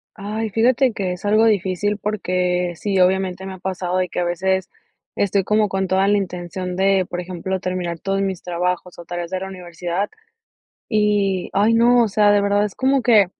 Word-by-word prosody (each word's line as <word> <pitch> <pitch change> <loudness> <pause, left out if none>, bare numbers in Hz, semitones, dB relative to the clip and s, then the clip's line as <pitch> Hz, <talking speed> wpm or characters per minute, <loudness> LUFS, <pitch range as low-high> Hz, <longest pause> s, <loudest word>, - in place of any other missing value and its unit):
Ay, 215 +1 -4
fíjate 245 +3 +3
que 185 -3 -2
es 180 - -9
algo 215 +2 +4
difícil 205 0 0
porque 180 -4 -1
sí, 195 +2 -1
obviamente, 190 0 +1
me 190 - -6
ha - - -9
pasado 185 -1 -3
de 185 -1 0
que - - -3
a - - +1
veces 190 +2 0 0.5
estoy 200 -1 +1
como 210 +1 +2
con 190 0 -1
toda 190 +1 +2
la 205 0 +4
intención 180 0 -5
de, 190 -1 +2
por 175 - -4
ejemplo, 185 +1 -4
terminar 180 -2 -3
todos 195 0 -1
mis 190 -3 -3
trabajos, 180 0 -3
o, 170 - -9
tareas 175 0 -5
de 185 - -1
la 190 - -5
universidad. 180 +1 -4 0.8
Y, 205 -4 +1
ay, 210 +4 +3
no, 240 +1 +5
o 225 - +1
sea, 205 0 +4
de 205 - +4
verdad 200 0 +2
es 210 - -4
como 270 +1 +2
que 225 -5 +5
190 Hz, 195 wpm, -21 LUFS, 180-205 Hz, 0.8 s, no